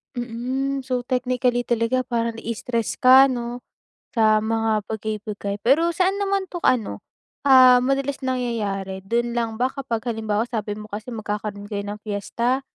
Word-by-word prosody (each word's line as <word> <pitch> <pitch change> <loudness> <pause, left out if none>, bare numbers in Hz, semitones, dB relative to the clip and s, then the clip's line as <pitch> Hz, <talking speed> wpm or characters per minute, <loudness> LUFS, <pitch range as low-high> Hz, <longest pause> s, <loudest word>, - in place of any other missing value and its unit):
Mm, 255 +3 -3
so 250 -1 -1
technically 250 -1 0
talaga 240 +2 0
parang 230 -2 -1
nai-stress 230 0 -3
ka, 260 +1 +8
'no, 245 -2 -4 0.5
sa 215 -2 +3
mga 225 -1 0
bagay-bagay. 210 -2 -4
Pero 325 +8 +3
saan 375 +3 +1
naman 395 -2 -1
'to 350 - -4
ano, 215 - +1 0.5
ah, 255 -2 +8
madalas 275 +2 0
nangyayari, 200 -7 -2
do'n 235 +2 0
lang 235 -2 -2
ba 250 +3 0
kapag 240 -5 -4
halimbawa 220 -1 -1
sabi 210 -3 -3
mo 215 +1 -10
kasi 215 +4 -6
magkakaroon 210 -1 -5
kayo 200 -1 -3
ng 205 +1 -6
piyesta, 235 +6 -2
235 Hz, 145 wpm, -23 LUFS, 215-255 Hz, 0.5 s, ka